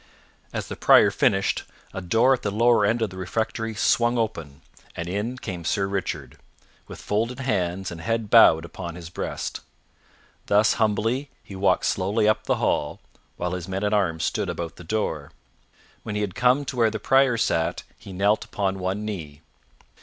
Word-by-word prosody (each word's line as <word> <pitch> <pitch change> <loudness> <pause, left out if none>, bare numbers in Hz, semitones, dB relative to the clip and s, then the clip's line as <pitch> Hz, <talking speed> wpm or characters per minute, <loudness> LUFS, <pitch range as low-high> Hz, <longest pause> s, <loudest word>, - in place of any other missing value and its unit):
As - - -4
the - - -6
Prior - - +6
finished, 95 0 +1 0.3
a 95 - -5
door 115 +9 +3
at 125 - -2
the 105 - -1
lower 110 0 +3
end 115 +2 +1
of 105 - -2
the 95 - -10
refectory 110 +4 -3
swung 120 +2 +2
open, 85 -12 -3 0.3
and 85 - -4
in 105 +7 -3
came 90 -8 -6
Sir 100 +4 0
Richard, 95 -2 -4 0.5
with - - -10
folded 115 +5 -2
hands 95 -7 -1
and 85 -1 -8
head 115 +2 -2
bowed 85 -8 +7
upon 85 0 -7
his 85 -1 -9
breast. - - -4 0.9
Thus 105 +1 +4
humbly 115 +6 0
he 100 - -10
walked 95 +1 +2
slowly 105 +3 +1
up 110 - +1
the - - +2
hall, 75 - -1 0.4
while 90 0 -2
his 90 -1 -4
men 95 +1 -3
at 105 +1 +1
arms 85 -6 +1
stood - - -1
about 85 -1 -5
the - - -10
door. 80 -6 -3 0.7
When 105 - -5
he 105 - -1
had 100 -3 -2
come 125 +6 +2
to 130 - -5
where 115 -2 +4
the 110 - -4
Prior 135 +2 +3
sat, 80 -7 0
he 100 - -12
knelt 100 +3 +1
upon 95 -1 -2
one 95 +3 -2
knee. 80 -8 -6
100 Hz, 180 wpm, -24 LUFS, 90-115 Hz, 0.9 s, bowed